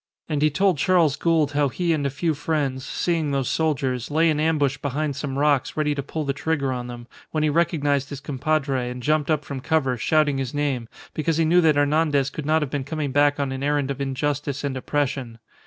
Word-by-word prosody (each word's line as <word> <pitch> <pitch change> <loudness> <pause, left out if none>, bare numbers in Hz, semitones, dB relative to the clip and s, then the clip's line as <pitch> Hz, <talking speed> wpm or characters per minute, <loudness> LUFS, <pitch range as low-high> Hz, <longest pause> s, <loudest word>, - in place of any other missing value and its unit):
And 150 -3 -1
he 155 - +4
told 185 +1 +1
Charles 170 -5 +3
Gould 160 -4 +2
how 145 -1 +2
he 170 +6 0
and 145 -3 0
a - - -1
few 155 +4 -1
friends, 140 -3 -2
seeing 165 +1 -1
those 135 -2 0
soldiers, 130 -6 -1
lay 160 +2 +3
in 150 - -1
ambush 145 -4 +1
behind 145 +1 -2
some 140 -1 -4
rocks 145 -1 +1
ready 150 -1 +1
to 140 - -3
pull 150 +2 -4
the 140 - 0
trigger 140 -2 -1
on 125 -1 -4
them, 120 -1 -8 0.2
when 155 -1 -1
he 155 - +3
recognized 145 -4 +1
his 140 - -6
compadre 140 -2 -1
and 125 0 -7
jumped 155 +2 +1
up 155 -2 +1
from 140 -2 -5
cover, 135 -3 0
shouting 145 +3 +2
his 130 0 -4
name, 140 -5 -1 0.3
because 155 +1 0
he 165 - +3
knew 175 +3 +5
that 160 -3 +4
Hernandez 145 -1 +2
could 150 -2 -6
not 155 0 +3
have 135 - -5
been 145 -2 -2
coming 145 0 -3
back 145 +1 +3
on 140 -2 -1
an 135 0 -4
errand 145 -1 0
of 140 0 -5
injustice 140 +1 -2
and 140 -2 -2
oppression. 130 -3 -2
145 Hz, 220 wpm, -23 LUFS, 135-155 Hz, 0.3 s, knew